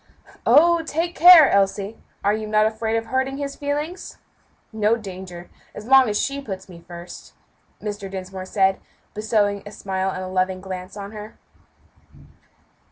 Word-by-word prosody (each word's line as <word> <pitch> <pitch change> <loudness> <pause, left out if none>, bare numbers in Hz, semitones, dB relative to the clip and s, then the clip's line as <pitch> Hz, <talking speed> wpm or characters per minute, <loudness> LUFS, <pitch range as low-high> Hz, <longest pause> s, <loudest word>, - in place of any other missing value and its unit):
"Oh! 340 +2 +5
take 330 +2 -2
care, 340 -3 +9
Elsie; 200 +2 +1 0.3
are 205 +1 +2
you 215 0 -3
not 215 0 +3
afraid 220 +1 -1
of 225 - -3
hurting 265 +2 -1
his 280 -1 -5
feelings?" 295 +5 -4 0.6
"No 220 +1 +2
danger, 185 -5 -9 0.2
as 210 - -8
long 265 -1 +6
as 210 - 0
she 280 0 -2
puts 190 -7 -7
me 170 -3 -13
first," 175 0 -11 0.5
Mr. 205 -2 -6
Dinsmore 190 0 -7
said, 190 -1 +2 0.3
bestowing 210 -2 0
a 205 - -10
smile 190 -2 -3
and 185 0 -5
loving 185 0 0
glance 185 +1 -8
on 200 0 -7
her. 215 0 -10
210 Hz, 150 wpm, -22 LUFS, 190-260 Hz, 0.6 s, care